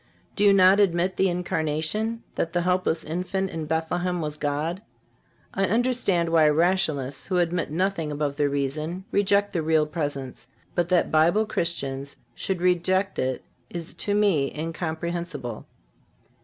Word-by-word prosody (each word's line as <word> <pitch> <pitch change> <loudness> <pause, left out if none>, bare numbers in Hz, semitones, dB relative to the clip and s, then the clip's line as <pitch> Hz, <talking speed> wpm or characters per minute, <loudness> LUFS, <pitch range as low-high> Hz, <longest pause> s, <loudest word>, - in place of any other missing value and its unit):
Do 205 - +1
you 205 - +7
not 195 0 +6
admit 180 -2 +2
the 190 - +2
Incarnation—that 175 +4 -2
the 175 - +1
helpless 180 -2 +1
infant 185 +4 -2
in 160 -2 -4
Bethlehem 175 +3 -1
was 150 -2 -3
God? 150 +5 -2 0.7
I 195 - +1
understand 220 -6 +1
why 160 -2 +5
Rationalists, 150 -5 +1
who 185 - 0
admit 175 -1 0
nothing 165 -1 -1
above 145 -1 -2
their 145 -1 +1
reason, 155 +6 -2
reject 200 0 +2
the 170 - 0
Real 155 -1 +3
Presence; 140 -6 -4 0.3
but 175 0 0
that 180 -2 +2
Bible 170 +8 +4
Christians 140 -8 -2 0.2
should 190 -3 -3
reject 185 +2 +1
it 130 0 -1 0.3
is 170 -1 -7
to 205 - -1
me 195 -10 +2
incomprehensible. 165 -5 -4
170 Hz, 140 wpm, -25 LUFS, 155-185 Hz, 0.7 s, you